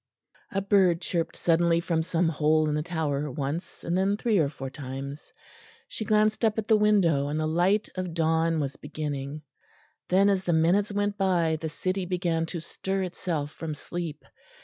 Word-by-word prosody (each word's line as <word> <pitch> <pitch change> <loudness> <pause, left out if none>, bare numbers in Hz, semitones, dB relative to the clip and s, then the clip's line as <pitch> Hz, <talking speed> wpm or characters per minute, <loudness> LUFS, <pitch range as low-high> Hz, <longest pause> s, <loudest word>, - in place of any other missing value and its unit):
A 195 -1 -1
bird 190 -4 +4
chirped 170 -1 -2
suddenly 170 0 +3
from 170 -1 0
some 170 0 +1
hole 155 0 +2
in 150 - 0
the 150 - 0
Tower, 150 -3 -2
once, 145 +6 -4
and 170 - -1
then 195 +2 +2
three 215 -3 +2
or 145 -3 +2
four 135 -2 -7
times; 135 +1 -7 0.6
she - - -5
glanced 215 +1 +2
up 220 -1 +2
at 220 - -1
the 220 - +4
window 195 -9 +3
and 150 +2 -2
the 155 - 0
light 180 +6 +2
of 180 -3 -4
dawn 165 0 +2
was 140 -2 -3
beginning. 145 -1 -5 0.7
Then, 195 +2 +4
as 195 -2 +2
the 175 - +2
minutes 180 +6 +3
went 205 0 -1
by, 175 -4 +2
the 160 - -2
city 185 +3 -2
began 170 -3 0
to 170 - -4
stir 190 +4 -3
itself 170 -5 -3
from 155 -1 -5
sleep. 165 -1 -6
170 Hz, 180 wpm, -27 LUFS, 155-190 Hz, 0.7 s, bird